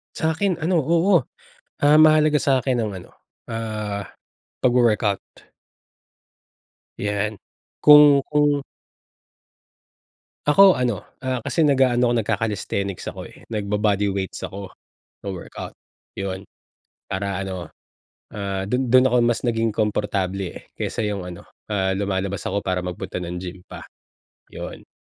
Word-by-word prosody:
Sa'kin 160 Hz, +2 st, 0 dB
ano, 175 Hz, +3 st, +2 dB
oo. 165 Hz, +6 st, +3 dB, 0.7 s
Ah, 150 Hz, +1 st, +6 dB
mahalaga 155 Hz, -1 st, +5 dB
sa'kin 130 Hz, -3 st, +1 dB
ang 110 Hz, -3 st, -2 dB
ano, 95 Hz, -, -10 dB, 0.4 s
ah, 105 Hz, -3 st, -4 dB, 0.6 s
pagwo 125 Hz, -1 st, +4 dB
work-out. 105 Hz, -3 st, +1 dB, 1.8 s
Yan. 105 Hz, +1 st, -2 dB, 0.4 s
Kung 150 Hz, -1 st, +8 dB
kung 145 Hz, -1 st, +2 dB, 1.8 s
Ako 190 Hz, +5 st, +7 dB
ano, 125 Hz, -6 st, 0 dB, 0.2 s
ah, 130 Hz, -1 st, -1 dB
kasi 160 Hz, +8 st, 0 dB
nag-aano 130 Hz, -4 st, +3 dB
ako, -, -, +1 dB
nagka-calisthenics 100 Hz, -3 st, -2 dB
ako, -, -, -6 dB
eh, -, -, -18 dB
nagbo-body 105 Hz, -1 st, 0 dB
weights 95 Hz, -1 st, -4 dB
ako. 100 Hz, -1 st, -7 dB, 0.5 s
Wo-workout, 95 Hz, -3 st, -7 dB, 0.4 s
'yon. 95 Hz, 0 st, -5 dB, 0.6 s
Para 95 Hz, 0 st, -3 dB
ano, 95 Hz, -3 st, -5 dB, 0.7 s
ah, 100 Hz, -2 st, -3 dB
dun 125 Hz, +4 st, -1 dB
dun 130 Hz, +1 st, +6 dB
ako 125 Hz, -1 st, +3 dB
mas 120 Hz, +1 st, +1 dB
naging 115 Hz, -1 st, +1 dB
komportable, 100 Hz, -3 st, -1 dB
eh, -, -, -11 dB
kaysa 110 Hz, -, -3 dB
'yong 100 Hz, -2 st, -3 dB
ano, 85 Hz, -, -11 dB, 0.2 s
ah, 95 Hz, -2 st, +1 dB
lumalabas 100 Hz, 0 st, -2 dB
ako 100 Hz, -, 0 dB
para 95 Hz, -3 st, -2 dB
magpunta 90 Hz, 0 st, -5 dB
ng 90 Hz, 0 st, -5 dB
gym 90 Hz, 0 st, -8 dB
pa, -, -, -9 dB, 0.6 s
'yon. -, -, -9 dB
105 Hz, 120 wpm, -22 LUFS, 100-130 Hz, 1.8 s, Kung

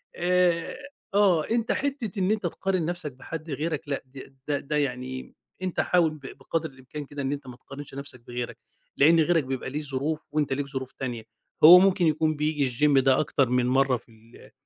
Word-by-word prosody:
آآ 175 Hz, +1 st, +1 dB, 0.4 s
آه، 190 Hz, -6 st, +4 dB
أنت 230 Hz, +1 st, +1 dB
حِتّة 260 Hz, -8 st, -2 dB
إن 190 Hz, +2 st, +2 dB
أنت 215 Hz, -3 st, 0 dB
تقارن 185 Hz, 0 st, -1 dB
نفسك 175 Hz, -3 st, -4 dB
بحد 155 Hz, +5 st, -8 dB
غيرك 155 Hz, +2 st, -2 dB
لأ، 140 Hz, -, -3 dB
د 135 Hz, +1 st, -12 dB
د 145 Hz, -1 st, -2 dB
ده 150 Hz, -, 0 dB
يعني 130 Hz, -2 st, -3 dB, 0.3 s
أنت 185 Hz, -1 st, -3 dB
حاول 175 Hz, -3 st, +3 dB
ب 155 Hz, -1 st, -11 dB, 0.2 s
بقدر 160 Hz, +4 st, -3 dB
الإمكان 135 Hz, +3 st, -9 dB
كده 145 Hz, +1 st, -7 dB
إن 135 Hz, 0 st, -1 dB
أنت 140 Hz, -2 st, -5 dB
ما 125 Hz, -, -9 dB
تقارنش 140 Hz, +1 st, -10 dB
نفسك 140 Hz, -2 st, -8 dB
بغيرك، 120 Hz, 0 st, -5 dB, 0.4 s
لإن 165 Hz, +4 st, +6 dB
غيرك 165 Hz, -1 st, +3 dB
بيبقى 130 Hz, -1 st, -4 dB
ليه 150 Hz, +3 st, -3 dB
ظروف، 145 Hz, +2 st, -2 dB
وأنت 150 Hz, -3 st, 0 dB
ليك 140 Hz, +1 st, -2 dB
ظروف 130 Hz, -2 st, -5 dB
تانية؛ 120 Hz, -3 st, -4 dB, 0.4 s
هو 175 Hz, +4 st, +11 dB
ممكن 190 Hz, -1 st, +3 dB
يكون 155 Hz, 0 st, +2 dB
بييجي 150 Hz, -3 st, 0 dB, 0.2 s
الGym 140 Hz, -2 st, +5 dB
ده 135 Hz, -1 st, +4 dB
أكتر 135 Hz, -3 st, +1 dB
من 125 Hz, 0 st, +2 dB
مَرّة 135 Hz, 0 st, +3 dB
في 120 Hz, -, -22 dB
ال 115 Hz, +1 st, -18 dB
150 Hz, 190 wpm, -26 LUFS, 135-170 Hz, 0.4 s, هو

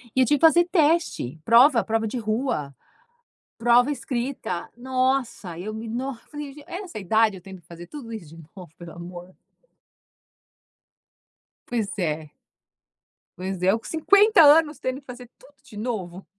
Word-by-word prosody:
E 260 Hz, 0 st, +4 dB
tive 295 Hz, +2 st, +2 dB
que 330 Hz, -, +5 dB
fazer 345 Hz, +2 st, +4 dB
teste, 320 Hz, -, +1 dB
prova, 240 Hz, +2 st, +6 dB
prova 225 Hz, 0 st, 0 dB
de 235 Hz, -, -4 dB
rua, 215 Hz, -, -2 dB, 0.8 s
prova 240 Hz, +3 st, +4 dB
escrita. 250 Hz, -9 st, -4 dB
Nossa, 255 Hz, -7 st, -1 dB
eu 210 Hz, +5 st, -6 dB
me 220 Hz, +1 st, -6 dB
nos 250 Hz, +2 st, -4 dB
eu -, -, -27 dB
falei: 295 Hz, -2 st, -7 dB
"Gen 295 Hz, 0 st, -13 dB
essa 360 Hz, -, -7 dB
idade, 215 Hz, +1 st, +2 dB
eu 180 Hz, -, -13 dB
tendo 190 Hz, -1 st, -11 dB
que -, -, -30 dB
fazer 170 Hz, 0 st, -10 dB
tudo 280 Hz, -6 st, -9 dB
isso 170 Hz, -9 st, -9 dB
de 165 Hz, -, -12 dB
novo, 180 Hz, -5 st, -11 dB
pelo 170 Hz, -1 st, -10 dB
amor". 175 Hz, +1 st, -10 dB, 2.3 s
Pois 225 Hz, -4 st, -2 dB
é. 155 Hz, -4 st, -3 dB, 1.1 s
Pois 185 Hz, 0 st, -5 dB
é, 185 Hz, -, +5 dB
eu 220 Hz, -, 0 dB
com -, -, -20 dB
50 400 Hz, +5 st, +4 dB
anos 300 Hz, 0 st, +5 dB
tendo 260 Hz, +1 st, -3 dB
que 280 Hz, -, -25 dB
fazer 250 Hz, -1 st, -10 dB
tudo 280 Hz, +3 st, -20 dB
de 235 Hz, -7 st, -13 dB
novo. 195 Hz, -5 st, -5 dB
235 Hz, 160 wpm, -24 LUFS, 185-280 Hz, 2.3 s, prova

